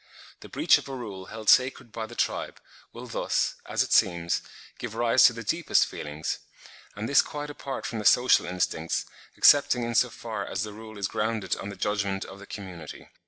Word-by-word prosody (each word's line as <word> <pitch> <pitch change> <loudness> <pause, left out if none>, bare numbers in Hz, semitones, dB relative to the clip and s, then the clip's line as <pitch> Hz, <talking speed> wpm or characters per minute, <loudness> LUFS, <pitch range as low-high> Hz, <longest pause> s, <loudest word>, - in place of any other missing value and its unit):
The - - -12
breach - - +4
of - - -10
a 135 - -5
rule 100 -7 -7
held 110 -1 -9
sacred 130 -2 +4
by 110 0 -5
the 120 - -11
tribe, - - -2 0.3
will - - -9
thus, - - 0
as - - +1
it - - -2
seems, 85 -2 +2 0.4
give 110 - -6
rise 120 +2 +5
to 120 - +6
the 115 0 -7
deepest 165 +9 +2
feelings,—and 80 +7 -7
this 140 - +6
quite 145 0 -6
apart 135 -2 -6
from 115 - -3
the 105 - -6
social 125 -6 +5
instincts, 90 -3 -1 0.3
excepting 135 -4 +5
in 120 0 -2
so - - +4
far - - -5
as 95 - -3
the 105 -1 -6
rule 110 0 -11
is 100 -2 -1
grounded 110 -1 -1
on 100 - -6
the 100 - -7
judgment 100 -1 -1
of 95 +1 -11
the 100 - -12
community. 90 -6 -9
110 Hz, 195 wpm, -27 LUFS, 95-120 Hz, 0.4 s, to